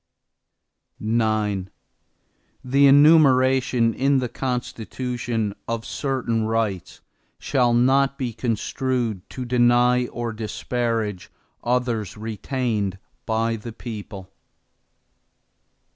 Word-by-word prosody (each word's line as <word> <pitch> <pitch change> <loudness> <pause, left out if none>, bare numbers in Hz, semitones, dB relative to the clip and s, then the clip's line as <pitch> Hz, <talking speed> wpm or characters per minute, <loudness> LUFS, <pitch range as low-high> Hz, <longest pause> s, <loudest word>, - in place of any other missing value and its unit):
IX 110 -3 0 0.9
The 140 +2 +4
enumeration 130 -5 +5
in 140 +3 +2
the 125 -2 -1
Constitution, 120 -3 -3
of 115 -1 -3
certain 125 -5 -1
rights, 110 -5 -2 0.4
shall 125 -4 +1
not 135 +3 +3
be 125 -3 -3
construed 120 -1 -2
to 130 - -6
deny 120 0 +3
or 120 -1 -4
disparage 110 -2 -3 0.3
others 120 -5 -1
retained 110 -2 -2 0.3
by 115 0 0
the 115 +2 -8
people. 105 -5 -8
120 Hz, 85 wpm, -23 LUFS, 110-130 Hz, 0.9 s, enumeration